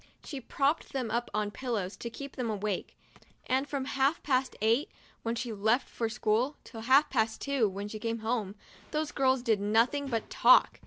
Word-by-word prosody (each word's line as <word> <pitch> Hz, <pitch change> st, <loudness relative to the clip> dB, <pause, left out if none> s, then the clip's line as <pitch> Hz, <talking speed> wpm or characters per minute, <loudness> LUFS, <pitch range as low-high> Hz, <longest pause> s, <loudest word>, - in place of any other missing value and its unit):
She 280 Hz, -4 st, -6 dB
propped 280 Hz, +5 st, 0 dB
them 255 Hz, -5 st, -2 dB
up 240 Hz, +2 st, -1 dB
on 210 Hz, -1 st, -1 dB
pillows, 215 Hz, -6 st, -3 dB
to 235 Hz, -, -5 dB
keep 275 Hz, +4 st, -8 dB
them 245 Hz, -3 st, -2 dB
awake, 210 Hz, -2 st, -3 dB, 0.5 s
and 265 Hz, +3 st, 0 dB
from 275 Hz, -2 st, -2 dB
half 275 Hz, +3 st, +1 dB
past 260 Hz, -2 st, +1 dB
eight, 230 Hz, +7 st, +2 dB, 0.3 s
when 230 Hz, +1 st, -2 dB
she 235 Hz, -1 st, -3 dB
left 220 Hz, +5 st, +2 dB
for 230 Hz, -1 st, -2 dB
school, 230 Hz, +4 st, +1 dB
till 225 Hz, -, -9 dB
half 265 Hz, +6 st, +5 dB
past 220 Hz, -3 st, +1 dB
two, 275 Hz, -7 st, +1 dB
when 200 Hz, +2 st, -5 dB
she 215 Hz, +1 st, -6 dB
came 230 Hz, +1 st, -2 dB
home, 220 Hz, -4 st, -1 dB, 0.3 s
those 305 Hz, 0 st, -1 dB
girls 260 Hz, -2 st, +2 dB
did 220 Hz, -5 st, +2 dB
nothing 230 Hz, +7 st, +2 dB
but 230 Hz, -4 st, -2 dB
talk. -, -, +5 dB
235 Hz, 190 wpm, -30 LUFS, 220-270 Hz, 0.5 s, half